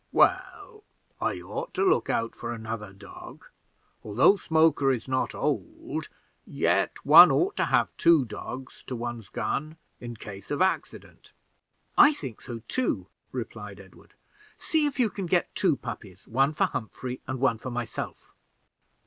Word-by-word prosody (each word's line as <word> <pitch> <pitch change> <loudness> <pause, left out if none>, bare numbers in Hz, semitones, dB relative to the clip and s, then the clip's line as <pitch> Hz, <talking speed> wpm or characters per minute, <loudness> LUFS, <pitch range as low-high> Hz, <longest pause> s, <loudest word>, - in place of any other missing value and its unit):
"Well, 430 -4 +1 0.4
I - - -1
ought - - -6
to 395 - +1
look 380 - +2
out 115 0 0
for 120 - -5
another 110 -2 -6
dog: 100 0 -12 0.6
although 110 - +4
Smoker 160 -6 +3
is 125 -1 -3
not 130 0 -1
old, - - -3 0.3
yet - - 0
one 165 +5 +10
ought 390 +3 +1
to - - +2
have - - +1
two 165 -5 +5
dogs 130 +3 -8
to 130 - -4
one's 120 -3 -5
gun 155 +7 -3 0.2
in 120 -1 -7
case 100 -2 -10
of 145 - -2
accident." 190 +1 -2 0.7
"I 300 - +8
think 130 - -8
so 115 -3 -8
too," 255 - -1 0.2
replied - - -7
Edward; - - -17 0.4
"see 310 -2 +1
if 275 -2 -5
you 230 -5 +3
can 190 -1 -5
get 175 +1 +1
two 180 -7 +2
puppies, 100 -6 -9
one 135 +6 +1
for - - +3
Humphrey 125 +3 -5
and 130 -1 -3
one 130 -4 +2
for 130 - -6
myself." 120 -1 -6
130 Hz, 150 wpm, -27 LUFS, 115-170 Hz, 0.7 s, one